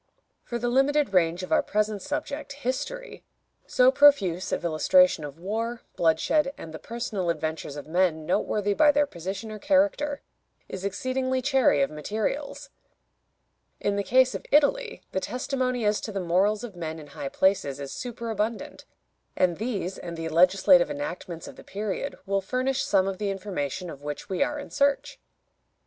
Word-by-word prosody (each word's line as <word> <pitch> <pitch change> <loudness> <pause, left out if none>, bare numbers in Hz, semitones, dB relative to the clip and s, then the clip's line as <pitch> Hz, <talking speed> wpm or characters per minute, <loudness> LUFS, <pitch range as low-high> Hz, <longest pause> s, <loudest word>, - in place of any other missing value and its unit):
For 240 - -4
the 240 +1 -2
limited 270 0 +2
range 175 0 +2
of 185 - -7
our - - +5
present 210 -1 -1
subject, 290 0 -4
history, 285 - -4 0.4
so 255 +1 +5
profuse 240 -12 +4
of - - -2
illustration 170 - +4
of 145 0 -7
war, 225 +6 -3
bloodshed, 270 - +2
and 160 - -9
the 160 - -7
personal 220 -6 -3
adventures 160 -3 -3
of 145 - -7
men 160 -1 +1
noteworthy 205 +4 0
by 295 +7 +5
their 290 0 +3
position 195 - -6
or 215 - -7
character, 290 0 +1 0.4
is 190 - -7
exceedingly 255 +6 -1
chary 255 - +3
of 135 - -1
materials. 215 - -4 1.1
In 205 - 0
the 200 - 0
case 255 +4 +3
of - - -5
Italy 450 - +2
the - - 0
testimony 255 +1 -2
as 210 0 +2
to 215 - -5
the 200 - -3
morals 195 +5 +1
of 225 -6 -7
men 160 -2 -5
in 155 - -10
high 140 -1 -6
places 165 -8 +1
is 140 -1 -6
superabundant, 230 -2 -4 0.5
and 180 -3 +2
these 200 -5 -3
and 170 -1 -7
the 165 0 -3
legislative 180 +2 +5
enactments 165 +3 -5
of - - -11
the - - -12
period 210 +7 -4
will 195 0 0
furnish 255 +6 -1
some 195 -1 +2
of 195 -1 -3
the 205 -1 -1
information 185 -4 -3
of 145 -4 -9
which 145 +6 -6
we 190 - -2
are 295 - +1
in 290 - -8
search. 280 0 +1
205 Hz, 165 wpm, -26 LUFS, 175-260 Hz, 1.1 s, our